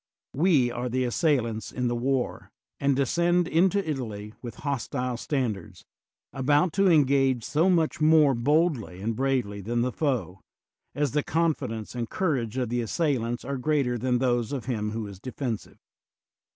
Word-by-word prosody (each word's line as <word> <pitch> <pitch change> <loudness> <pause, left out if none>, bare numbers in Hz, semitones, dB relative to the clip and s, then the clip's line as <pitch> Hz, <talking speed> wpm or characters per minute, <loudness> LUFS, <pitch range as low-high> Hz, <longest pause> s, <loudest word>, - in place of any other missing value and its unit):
We 145 -6 +3
are 125 +1 -3
the 130 +1 0
as 120 - -2
sailants 120 -9 0
in 125 -1 -1
the 120 - 0
war, 130 +1 -1 0.3
and 140 -1 +2
descend 170 +6 +2
into 190 +3 +2
Italy 110 -8 -4
with 120 -2 -7
hostile 125 -2 -2
standards, 120 - -3 0.5
about 145 +5 +2
to 195 0 +3
engage 135 -5 +3
so 160 - +2
much 165 -4 +1
more 155 -2 +5
boldly 135 - +1
and 110 +3 -2
bravely 125 -6 -1
than 120 +4 -1
the 125 - -1
foe, 115 - -2 0.5
as 145 -2 0
the 150 - +1
con 165 +2 +1
fidence 115 -6 -6
and 120 -2 -4
courage 130 - -1
of 125 -3 -1
the 120 +1 0
assailants 120 -2 -1
are 140 +1 -3
greater 140 -3 +1
than 125 +1 0
those 120 -3 0
of 135 -5 -4
him 110 -4 -2
who 110 0 -4
is 100 -2 -9
defensive. 125 -1 -5
130 Hz, 165 wpm, -26 LUFS, 115-150 Hz, 0.5 s, more